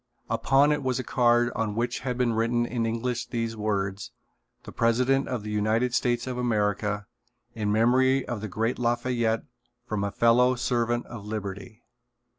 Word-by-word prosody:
Upon 140 +2 +3
it 150 - 0
was 130 -2 -1
a 130 - -2
card 120 0 +3
on 110 -3 -1
which 120 +1 -1
had 125 -2 -3
been 125 -2 +1
written 115 +1 +1
in 120 -1 -1
English 115 +2 -2
the 115 -1 -2
words: 100 -2 -2 0.5
"The - - -9
President 125 +4 +2
of 125 -5 -3
the 105 - -5
United 110 +4 +1
States 120 -2 +1
of 125 -1 -4
America. 105 -3 0 0.5
In 105 -3 -1
memory 130 +4 +3
of 120 -4 -4
the 110 - -4
great 115 +6 -1
Lafayette 120 -1 0 0.4
from 105 -4 -2
a 100 - 0
fellow 120 +4 +4
servant 120 -1 0
of 105 -4 -9
liberty." 100 -1 -6
120 Hz, 165 wpm, -26 LUFS, 110-125 Hz, 0.5 s, fellow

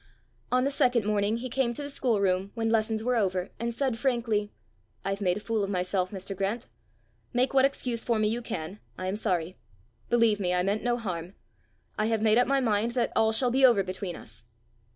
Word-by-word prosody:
On 255 0 +3
the 280 - +1
second 245 -5 +2
morning 210 +1 +1
he 250 +2 -4
came 255 -1 0
to 290 - -4
the 285 - -5
schoolroom 200 -8 +1
when 225 -1 0
lessons 220 -1 +1
were 250 +1 +1
over, 185 -3 0
and 235 +1 -1
said 240 -1 -1
frankly, 230 -5 0 0.5
"I've 195 +1 -2
made 180 -1 +1
a - - -3
fool 220 0 -1
of 195 - -2
myself, 185 -1 0
Mr. 195 0 -6
Grant! 200 +6 -2 0.7
Make 255 +2 +2
what 265 0 +6
excuse 250 -4 -1
for 235 -2 +1
me 215 0 +2
you 230 +3 -1
can. 185 -3 -5 0.2
I 185 - -4
am 190 +2 -1
sorry. 185 -5 -1 0.5
Believe 230 -3 +3
me, 180 -2 +1
I 180 - +2
meant 200 +3 0
no 240 0 +1
harm. 180 -4 -5 0.6
I 215 - +2
have 225 -1 0
made 220 +1 +5
up 245 - +3
my 275 +1 +3
mind 230 -1 +1
that 240 -2 0
all 220 0 +4
shall 245 +2 +2
be 265 +2 +2
over 235 -6 +6
between 185 -1 -5
us." 110 +1 -7
220 Hz, 215 wpm, -28 LUFS, 195-240 Hz, 0.7 s, what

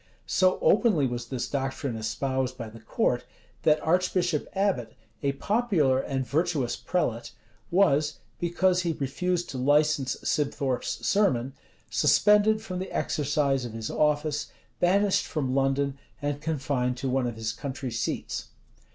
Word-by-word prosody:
[] - - -36
So 185 -1 +3
openly 205 - +4
was 120 -1 -3
this 130 -3 -3
doctrine 135 -2 -2
espoused 130 +4 -2
by 115 -3 -6
the 115 +1 -12
court, 120 +2 0 0.4
that 155 -1 +4
Archbishop 175 -1 +1
Abbot, 190 - 0 0.3
a 140 -1 +1
popular 175 - +2
and 135 -1 -2
virtuous 150 -3 0
prelate, 120 -10 -2 0.4
was, 155 -5 +3 0.2
because 180 +1 +2
he 170 -2 0
refused 175 +6 -1
to 130 - -5
license 145 0 +2
Sibthorpe's 140 -3 -1
sermon, 135 - +2 0.4
suspended 210 +1 +4
from 185 -4 -4
the 190 - -5
exercise 145 -2 0
of 120 -2 -6
his 115 -1 -4
office, 150 0 +1 0.3
banished 195 +2 +3
from 135 -5 -2
London, 135 0 +1 0.2
and 145 0 -2
confined 135 -5 -1
to 135 +2 -3
one 130 -1 +1
of 120 - -4
his 110 -1 -2
country 130 +1 -5
seats. 115 0 -3
140 Hz, 140 wpm, -27 LUFS, 130-175 Hz, 0.4 s, openly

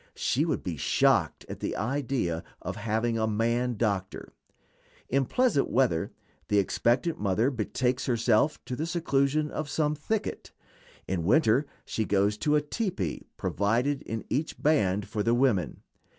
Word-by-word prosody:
She - - +1
would - - -1
be - - -4
shocked - - +2
at - - -7
the - - -3
idea 120 - -1 0.2
of 90 +2 -5
having 115 +2 -1
a 110 - +1
man 115 +2 0
doctor. 100 -4 -2 0.8
In 135 +1 +2
pleasant 240 - +2
weather 115 -11 +1 0.4
the 105 - +2
expectant 120 - +1
mother 105 +6 +1
betakes 125 +2 -1
herself 120 +4 +2
to 125 - -4
the 155 +5 -3
seclusion 150 -3 +1
of 155 -1 -4
some 150 -1 +1
thicket; 200 +9 -3 0.5
in 90 -3 -1
winter 135 - +3 0.2
she 110 - -2
goes 100 +1 +2
to 150 -1 +2
a 150 - +4
tepee 150 - -3
provided 120 +7 0
in 115 0 -5
each 150 +5 -2
band 105 -10 +2
for 105 - -2
the 115 +3 +2
women. 120 - +1
120 Hz, 150 wpm, -28 LUFS, 105-145 Hz, 0.8 s, a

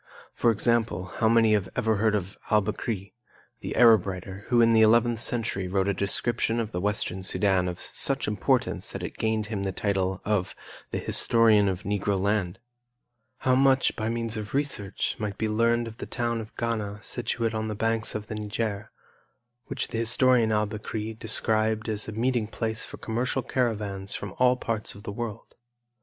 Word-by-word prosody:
For 120 - +2
example, 110 -5 0
how 110 - +3
many 115 -1 +4
have 100 -3 0
ever 110 -1 +1
heard 110 +1 +2
of 100 -1 -3
Al 105 -2 +4
Bekri, 105 -1 -4 0.5
the - - -5
Arab 115 -5 +6
writer, 95 +1 -6
who 120 -1 +3
in 115 0 +5
the 110 - +5
eleventh 115 +1 +4
century 115 -6 0
wrote 95 +1 0
a 100 - +2
description 115 +4 0
of 110 -1 -3
the 90 - -3
Western 100 -2 -1
Sudan 95 -1 +1
of 90 -1 -4 0.2
such - - +2
importance - - 0
that - - -6
it - - -7
gained 110 -1 0
him 105 -2 -4
the 95 -1 -1
title 95 -1 -1
of 105 -3 0 0.3
"The - - -3
Historian 110 -3 +4
of 95 0 -4
Negro 100 -1 -1
Land"? 100 -2 0 0.8
How 130 - +2
much, 135 0 +3
by 110 0 -2
means 115 -1 -2
of 105 +3 -5
research, 135 -9 -2
might 105 -2 -3
be 110 - -1
learned 115 +2 +2
of 115 0 -9
the - - -7
town 120 -2 -2
of 110 - -12
Ghana 105 -3 -3
situate 115 -2 -2
on 110 0 -2
the 110 - -3
banks 115 +1 0
of 105 0 -4
the 110 - -7
Niger, 105 0 -3 0.8
which 135 -1 -3
the 115 - -3
historian 120 0 +4
Al 105 0 +2
Bekri 110 +1 -5
described 110 0 +1
as 110 -1 0
a - - -4
meeting 115 0 0
place 110 0 -2
for - - -8
commercial 125 +3 -2
caravans 105 -6 -2
from 100 -2 -6
all 125 0 +4
parts 110 -5 -3
of 100 - -12
the - - -5
world? 115 0 -6
110 Hz, 185 wpm, -26 LUFS, 100-115 Hz, 0.8 s, Arab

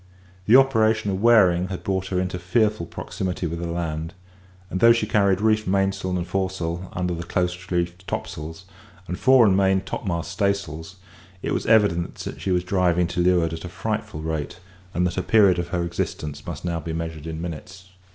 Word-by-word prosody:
The 110 - +7
operation 110 -6 +4
of 95 0 -2
wearing 95 -6 +5
had 95 -1 -6
brought 95 -1 -1
her 90 -1 -1
into 90 0 -2
fearful 105 0 +1
proximity 90 -1 -4
with 85 0 -3
the 85 - -3
land; 80 -1 -4 0.6
and 95 - -2
though 115 +2 +7
she 115 -2 0
carried 100 -3 +2
reefed 110 -1 +2
mainsail 95 -1 0
and 85 - -2
foresail 95 -1 -3
under 90 0 -1
close 90 +1 -1 0.2
reefed 90 +1 -2
topsails, 80 +4 -5 0.4
and 90 +3 -4
fore 130 -3 +6
and 95 -3 +4
main 95 -1 +3
topmast 85 -3 -4
staysails, 95 -5 -2 0.5
it - - -1
was - - -2
evident 105 -6 +3
that - - -7
she - - -3
was 90 -1 +2
driving 90 -2 +2
to 90 - -3
leeward 85 -2 +3
at 80 - -6
a 90 - -6
frightful 80 -2 -4
rate, 80 -1 -4 0.4
and 90 - +2
that 90 - 0
the - - -1
period 100 -5 +4
of 85 - -2
her 85 0 -1
existence 75 -3 -4
must 85 -1 -6
now 85 -1 -1
be 80 0 -5
measured 80 -1 -5
in 80 -1 -5
minutes. 90 +3 -8
90 Hz, 190 wpm, -23 LUFS, 85-95 Hz, 0.6 s, The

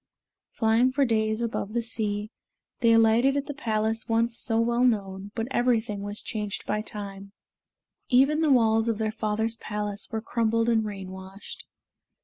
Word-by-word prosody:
Flying 230 +3 +2
for 275 +1 +2
days 220 -1 0
above 220 -2 -3
the 235 - +1
sea, 210 -2 -2 0.5
they 230 -2 +4
alighted 230 +4 +4
at 280 - -1
the 290 - -5
palace 220 -4 -1
once 230 +1 +2
so 225 -1 +1
well 235 +1 +2
known, 200 -5 0
but 225 0 -2
everything 235 -5 +1
was 205 +1 -4
changed 210 -3 -4
by 210 0 -1
time 200 -2 -8 0.8
even 275 +5 +4
the 310 -3 +3
walls 225 -2 +3
of 225 - 0
their 220 0 -1
father's 220 +1 -2
palace 210 -1 -4
were 220 - -1
crumbled 230 0 0
and 220 -2 +2
rain 195 -3 -6
washed. 190 +2 -10
220 Hz, 160 wpm, -26 LUFS, 210-235 Hz, 0.8 s, they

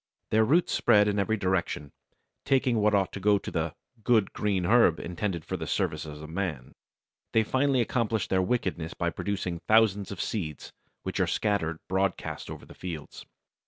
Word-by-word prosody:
Their 110 +1 +5
roots 160 +10 +3
spread 105 -3 +4
in 105 0 +1
every 110 +3 +1
direction, 90 -6 -1 0.5
taking 130 -3 +2
what 105 0 +3
ought 95 -2 +1
to - - -5
go 100 +1 +4
to - - -6
the 80 -1 -2 0.3
"good 110 -3 +3
green 100 -4 0
herb 105 -5 +5
intended 85 -1 -3
for - - -3
the - - -5
service - - -1
of 75 0 -8
man." 80 -6 -4 0.6
They 110 - +4
finally 130 +2 +2
accomplish 115 -3 0
their 95 -1 +2
wickedness 90 -6 -1
by 85 -1 -1
producing 95 -4 -3
thousands 105 -3 +4
of 100 - -6
seeds, 80 -9 -4 0.3
which - - -3
are - - +2
scattered 100 -7 0
broadcast 95 0 -2
over - - -8
the - - -13
fields. 80 -5 -8
100 Hz, 170 wpm, -28 LUFS, 85-110 Hz, 0.6 s, Their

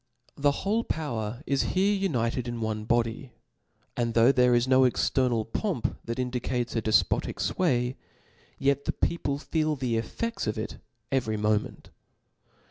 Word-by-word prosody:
The 145 0 +3 0.2
whole 220 +4 +2
power 120 - -3
is 140 -1 +1 0.2
here 200 +2 +4
united 125 - 0
in 120 -1 -4
one 110 -1 -3
fatody 120 +2 +1
i - - -24 0.7
and 120 -1 -1
though 115 +3 +6
there 125 -2 +4
is 120 +1 +2
no 130 0 +5
external 125 -2 +2
pomp 160 - -2
that 115 0 -4
indicates 125 -1 -2
a 115 - +1
delpotic 110 0 +2
fway, 125 -8 0 0.6
yet 140 +1 +1
the - - 0
people 145 -5 -1
feel 155 +1 0
the 125 -4 -1
effeds 230 - -4
of 110 - -1
it 110 - -5 0.3
every 115 -5 0
moment. 105 0 -1
125 Hz, 150 wpm, -27 LUFS, 115-140 Hz, 0.7 s, though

